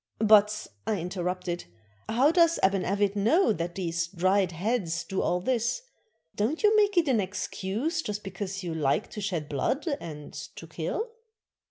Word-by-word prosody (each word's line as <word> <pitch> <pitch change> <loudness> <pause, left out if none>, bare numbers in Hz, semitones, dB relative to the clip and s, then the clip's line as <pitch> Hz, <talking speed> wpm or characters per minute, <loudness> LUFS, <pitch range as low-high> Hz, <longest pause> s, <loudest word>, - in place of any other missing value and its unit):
"But," 210 -1 +5 0.2
I 210 -3 +1
interrupted, 180 0 -3 0.4
"how 260 +7 +4
does 335 -1 +4
Aban 190 -1 +2
A\'it 200 0 +1
know 225 - +3
that 170 -1 -4
these 170 -3 -1
dried 185 +1 +2
heads 175 -2 -1
do 190 - -2
all 180 - +1
this? 240 - 0 0.5
Don't 240 - -1
you 425 +1 +5
make 410 -2 +3
it 335 -3 +4
an 250 -5 +3
excuse 205 - -2
just 210 -6 -4
because 195 0 -5
you 170 -2 -3
like 145 -4 0
to 210 - -6
shed 175 -7 -2
blood 205 - -1
and 150 -3 -8
to - - -8
kill?" 450 +1 -3
200 Hz, 160 wpm, -28 LUFS, 180-240 Hz, 0.5 s, But